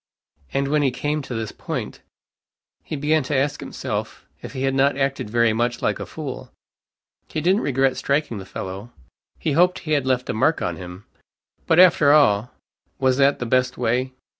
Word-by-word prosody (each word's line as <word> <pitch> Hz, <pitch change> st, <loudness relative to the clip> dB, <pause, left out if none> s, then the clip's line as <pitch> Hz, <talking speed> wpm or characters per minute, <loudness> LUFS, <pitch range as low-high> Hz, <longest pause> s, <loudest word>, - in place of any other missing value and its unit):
And 140 Hz, 0 st, 0 dB
when 150 Hz, +1 st, +2 dB
he 140 Hz, -, +3 dB
came 145 Hz, +4 st, -2 dB
to 130 Hz, -3 st, -6 dB
this 110 Hz, -1 st, -3 dB
point, -, -, -6 dB, 0.8 s
he -, -, -5 dB
began 150 Hz, +2 st, +1 dB
to 145 Hz, +2 st, -3 dB
ask 145 Hz, +2 st, 0 dB
himself, -, -, -5 dB, 0.2 s
if -, -, -8 dB
he 130 Hz, -1 st, -3 dB
had 135 Hz, 0 st, +1 dB
not 135 Hz, +1 st, +2 dB
acted 135 Hz, -5 st, -1 dB
very 115 Hz, 0 st, +3 dB
much 120 Hz, +2 st, -1 dB
like -, -, 0 dB
a -, -, -6 dB
fool. -, -, -7 dB, 0.8 s
He -, -, -3 dB
didn't 185 Hz, +6 st, +2 dB
regret 135 Hz, -1 st, +1 dB
striking 140 Hz, -6 st, -1 dB
the 95 Hz, -, -9 dB
fellow 95 Hz, +4 st, -6 dB, 0.5 s
he 155 Hz, -, -2 dB
hoped 180 Hz, +5 st, +3 dB
he 155 Hz, -, -4 dB
had 140 Hz, -3 st, +1 dB
left 125 Hz, -1 st, 0 dB
a -, -, -4 dB
mark 155 Hz, +9 st, +2 dB
on -, -, -2 dB
him. 90 Hz, +2 st, -10 dB, 0.6 s
But, 160 Hz, -, +3 dB
after 160 Hz, -5 st, +6 dB
all, 120 Hz, -7 st, +4 dB, 0.5 s
was 130 Hz, -1 st, +2 dB
that 140 Hz, 0 st, +4 dB
the 125 Hz, -, -4 dB
best 125 Hz, +1 st, +1 dB
way? 125 Hz, +2 st, 0 dB
135 Hz, 190 wpm, -22 LUFS, 120-145 Hz, 0.8 s, after